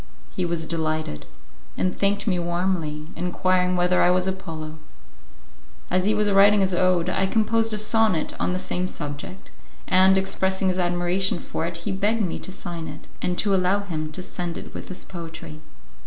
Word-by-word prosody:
He 180 - -2
was 170 -2 -2
delighted, 155 - -2 0.5
and 185 - 0
thanked 200 0 +1
me 185 -5 +1
warmly, 170 -3 -1
inquiring 180 +1 +1
whether 180 0 +3
I - - +5
was 180 0 +3
Apollo. 160 -5 -5 1.1
As 185 +1 +2
he 215 +1 +3
was 210 -1 +2
writing 200 +1 +6
his 190 -1 +2
ode, 180 -1 +2
I 190 +1 +1
composed 225 +2 +2
a 215 - -1
sonnet 215 -5 +2
on - - +1
the 180 - 0
same 185 0 -2
subject, 150 +4 -7 0.4
and, 190 +1 +5
expressing 190 0 +1
his 185 0 0
admiration 175 +1 +1
for 165 -1 -3
it 170 -1 -5
he 205 - -1
begged 210 +3 +1
me 180 - -2
to - - -6
sign 170 -3 -5
it, 150 - -9 0.2
and 180 0 -1
to 205 -2 +2
allow 190 +2 +2
him 155 -6 -4
to 185 - -4
send 175 -2 -4
it - - -9
with - - -7
his 185 - -8
poetry. 160 -3 -8
180 Hz, 180 wpm, -24 LUFS, 170-190 Hz, 1.1 s, writing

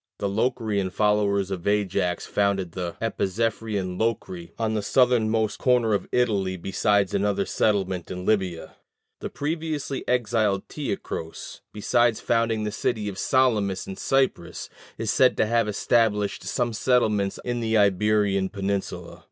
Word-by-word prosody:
The 100 - -2
Locrian 110 -2 0
followers 100 -1 +1
of 95 -1 -4
Ajax 100 -4 0
founded 100 -3 0
the 90 -1 -4
Epizephyrian 105 -3 -2
Locri 95 -6 -2
on 110 -1 -1
the 110 - 0
southernmost 110 -2 +2
corner 125 -4 +3
of 100 - -1
Italy, 100 -6 +1
besides 100 +2 +1
another 100 0 +1
settlement 95 -4 0
in 90 0 -6
Libya. 95 -6 -1 0.4
The - - -5
previously 155 -2 -3
exiled 110 -5 +1
Teucros, 100 - -5
besides 120 +2 +2
founding 115 -2 0
the 105 - -2
city 110 0 -2
of 100 -1 -7
Salamis 110 -8 +1
in 95 - -6
Cyprus, 130 -11 -1 0.3
is - - -1
said - - +4
to - - +3
have 115 0 +1
established 105 -1 +1
some 120 -2 -1
settlements 105 -4 +1
in 120 -1 -1
the 115 -1 +1
Iberian 100 -1 +2
peninsula. 100 -1 -4
105 Hz, 135 wpm, -25 LUFS, 95-115 Hz, 0.4 s, said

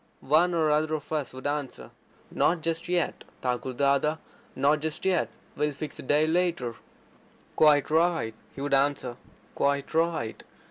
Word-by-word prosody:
One 175 +3 +5
or 155 -2 +2
other 155 +1 +2
of 150 0 -7
us 150 -5 -1
would 130 +1 -10
answer: 145 -2 -3 0.4
"Not 170 -1 +2
just 165 +1 -2
yet, 175 -2 0 0.2
Thakur 125 +1 -1
Dada, 140 +4 +2 0.4
not 150 +2 +3
just 160 +3 -4
yet. 185 -3 +2 0.3
We'll 150 0 0
fix 150 +2 -7
a - - -4
day 145 +3 +3
later." 165 -7 0 0.8
"Quite 150 -2 +4
right," 160 -8 +2 0.2
he 135 - -7
would 145 0 -1
answer. 135 -3 +1 0.4
"Quite 140 +1 0
right. 160 -8 0
150 Hz, 150 wpm, -27 LUFS, 140-160 Hz, 0.8 s, One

